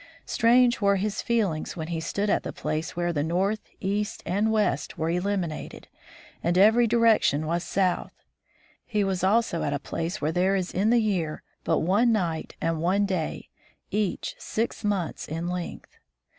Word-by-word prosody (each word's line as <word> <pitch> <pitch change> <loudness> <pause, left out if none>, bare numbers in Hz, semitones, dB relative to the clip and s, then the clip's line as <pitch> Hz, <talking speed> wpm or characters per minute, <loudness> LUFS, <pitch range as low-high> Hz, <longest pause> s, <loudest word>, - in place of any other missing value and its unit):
Strange 240 +1 +4
were 200 0 +4
his 205 +2 -1
feelings 200 -10 -1
when 160 0 -4
he 165 -1 -2
stood 200 +5 -2
at 205 - +2
the - - -5
place 155 +2 -3
where 175 0 0
north, 180 +8 0 0.2
east, 205 +2 -2
and 205 +5 +1
west 205 -10 0
were 160 +1 0
eliminated, 180 -3 -3 0.5
and 175 +1 +1
every 220 +5 +6
direction 225 -10 +3
was 170 +2 -1
south. 185 -2 0 0.7
He 210 -4 0
was 190 -2 -1
also 200 -3 +2
at 145 - -1
a 145 - -1
place 165 +4 -4
where 155 +1 0
there 185 +3 +2
is 185 -2 -1
in 200 +4 +2
the 240 - +5
year 180 -8 -1 0.2
but 165 - +1
one 205 +8 +3
night 175 -7 -1
and 165 -1 -1
one 190 +4 +2
day, 185 -5 -3 0.4
each 205 -2 -1
six 225 +1 -3
months 200 -6 -2
in 165 +3 -3
length. 180 -1 -5
190 Hz, 165 wpm, -26 LUFS, 165-210 Hz, 0.7 s, every